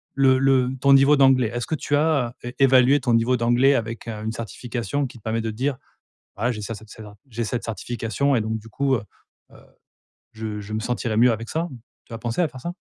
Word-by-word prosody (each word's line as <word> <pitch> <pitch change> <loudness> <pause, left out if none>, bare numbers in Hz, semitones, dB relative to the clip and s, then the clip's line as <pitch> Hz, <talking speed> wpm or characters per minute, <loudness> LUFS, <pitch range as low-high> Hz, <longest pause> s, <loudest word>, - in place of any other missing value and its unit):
le 135 -1 +4
le 130 -2 +3
ton 140 +1 +5
niveau 135 +2 +6
d'anglais, 130 -4 +4
est-ce 120 -1 -3
que 160 - -1
tu 145 0 -1
as 145 -4 +2
as 120 - -11
é 120 +1 -7
évalué 135 +1 +5
ton 120 -2 +1
niveau 115 +2 +3
d'anglais 120 +4 +3
avec, 115 0 -4
heu, 110 -1 -5
une 110 - -2
certification 120 +3 -4
qui 125 - -9
te 110 - -19
permet 115 +1 -1
de 115 - -3
te - - -11
dire: 130 +2 -1 0.6
«Ah 120 +4 0
j'ai 105 - -7
ça 115 +2 -5
cette 110 +1 -14
cedra 105 -2 -12
j'ai 115 0 -3
cette 120 +2 -3
certification 115 +4 -2
et - - +2
donc, 110 +1 -2
du 110 +1 -12
coup, 135 +3 +1
heu 110 - -2 0.5
heu, - - -16 0.8
je 110 -1 -5
je 105 +1 -8
me 110 - -1
sentirais 120 -2 -2
mieux 120 +1 +5
avec 115 +1 -4
ça.» 165 +2 -2 0.4
Tu 115 - -12
as - - -4
pensé 120 +8 -2
à 165 - +2
faire 130 - -11
ça? 175 +4 -4
120 Hz, 245 wpm, -23 LUFS, 110-135 Hz, 0.8 s, niveau